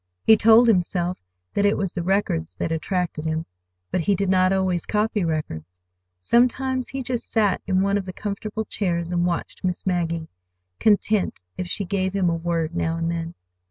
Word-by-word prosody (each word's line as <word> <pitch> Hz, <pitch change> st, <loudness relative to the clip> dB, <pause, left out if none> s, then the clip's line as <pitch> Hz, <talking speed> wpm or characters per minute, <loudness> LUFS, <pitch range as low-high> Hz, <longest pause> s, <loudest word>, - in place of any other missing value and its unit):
He 220 Hz, -, +7 dB
told 225 Hz, +3 st, +6 dB
himself 180 Hz, -3 st, +1 dB, 0.3 s
that 200 Hz, -, +1 dB
it 205 Hz, 0 st, +3 dB
was 195 Hz, -3 st, -2 dB
the 175 Hz, -, -2 dB
records 170 Hz, -, 0 dB
that 160 Hz, -, -3 dB
attracted 165 Hz, 0 st, -2 dB
him. 160 Hz, 0 st, -2 dB, 0.5 s
But 180 Hz, -, +1 dB
he 200 Hz, +4 st, +2 dB
did 195 Hz, 0 st, -1 dB
not 185 Hz, 0 st, +4 dB
always 185 Hz, -3 st, +1 dB
copy 210 Hz, -1 st, 0 dB
records. 90 Hz, -, -4 dB, 0.4 s
Sometimes 255 Hz, -, +2 dB
he 270 Hz, -1 st, -4 dB
just 245 Hz, -1 st, -3 dB
sat 210 Hz, -4 st, +2 dB
in 190 Hz, -1 st, +2 dB
one 200 Hz, +1 st, +2 dB
of 195 Hz, -, -6 dB
the 185 Hz, -, -5 dB
comfortable 215 Hz, +2 st, -4 dB
chairs 170 Hz, -5 st, -2 dB
and 175 Hz, 0 st, +1 dB
watched 170 Hz, -1 st, -4 dB
Miss 180 Hz, -1 st, -2 dB
Maggie, 170 Hz, -3 st, -1 dB, 0.5 s
content 210 Hz, -1 st, +2 dB, 0.2 s
if 180 Hz, -, -4 dB
she 200 Hz, +3 st, -2 dB
gave 190 Hz, 0 st, -1 dB
him 185 Hz, -3 st, +2 dB
a -, -, 0 dB
word 165 Hz, -1 st, -2 dB
now 165 Hz, -1 st, 0 dB
and 165 Hz, 0 st, -1 dB
then. 165 Hz, 0 st, -4 dB
185 Hz, 185 wpm, -23 LUFS, 170-205 Hz, 0.5 s, He